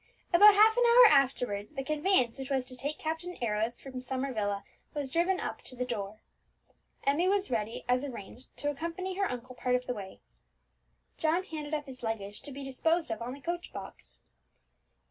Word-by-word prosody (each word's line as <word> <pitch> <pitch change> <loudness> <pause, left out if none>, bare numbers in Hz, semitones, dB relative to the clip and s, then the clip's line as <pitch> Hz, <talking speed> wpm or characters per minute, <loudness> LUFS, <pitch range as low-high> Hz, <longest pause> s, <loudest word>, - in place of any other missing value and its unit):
About 410 +4 +9
half 435 +2 +7
an - - +3
hour 480 +1 +8
afterwards 250 -5 +2
the 270 -2 -3
conveyance 295 -4 +2
which 265 0 -5
was 265 -2 0
to 255 0 -9
take 285 +4 -3
Captain 325 +3 -4
Arrows 225 +1 -1
from 260 -2 -7
Summer 265 +1 -2
Villa 205 -2 -1 0.3
was 280 -3 -3
driven 360 +3 +2
up - - -4
to 255 - -7
the 250 0 -2
door. 210 -3 -4 0.9
Emmie 290 +6 +2
was 395 -3 +1
ready, 220 -1 -2
as 250 +2 +2
arranged, 250 -2 -8
to 290 - -1
accompany 335 +6 -4
her 395 -1 +1
uncle 250 +1 -6
part 250 0 0
of 250 0 -1
the 250 - -2
way. 195 -4 -8 1.0
John 325 +4 +2
handed 310 -4 -4
up 295 -1 -4
his 260 -2 -10
luggage 210 -3 -4
to 285 - -8
be 275 +1 -7
disposed 320 +3 0
of 225 - -3
on 245 +3 -4
the 280 - -14
coach 345 +3 -4
box. - - -10
270 Hz, 190 wpm, -30 LUFS, 245-330 Hz, 1.0 s, About